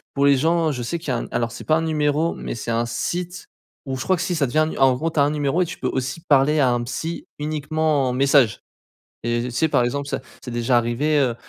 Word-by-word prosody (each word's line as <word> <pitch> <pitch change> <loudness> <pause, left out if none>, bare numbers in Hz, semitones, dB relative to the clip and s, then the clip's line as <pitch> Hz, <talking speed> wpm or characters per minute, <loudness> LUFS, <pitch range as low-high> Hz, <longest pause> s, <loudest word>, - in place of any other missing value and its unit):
pour 140 0 +2
les 140 -1 +5
gens 165 +2 +2
je 125 - -4
sais 145 +9 -2
qu'il 160 -4 -7
y - - +2
a 125 - 0
un - - -4
alors 115 -1 -1
c'est - - -8
pas 155 - +2
un 160 - -1
numéro 155 +1 +1
mais - - -6
c'est 115 0 -4
un 115 +1 0
site 175 +8 -3 0.4
ou 135 -1 -3
je 130 - -4
crois 190 - +2
que 175 - -3
si 180 - -1
ça 145 -5 +1
devient 145 +6 -3
un 155 - +4
nu - - -5
en 135 -1 +5
gros 165 +5 -2
tu 155 - -1
as 140 - +6
un 145 - +2
numéro 150 +3 0
et - - +3
tu 170 - -7
peux - - -2
aussi 135 +5 -3
parler 145 +2 +4
à 130 - +4
un 120 - 0
psy 165 +7 -4
uniquement 150 -2 0
en - - -1
message. 135 -3 +3 0.7
Et 120 0 0
tu 125 - -4
sais 125 +7 +1
par 130 -5 +2
exemple 140 +3 -2
ça - - -2 0.2
c'est 125 - -6
déjà 120 +1 +1
arrivé, 120 +6 +1
heu, 130 -4 +2
140 Hz, 280 wpm, -22 LUFS, 125-155 Hz, 0.7 s, as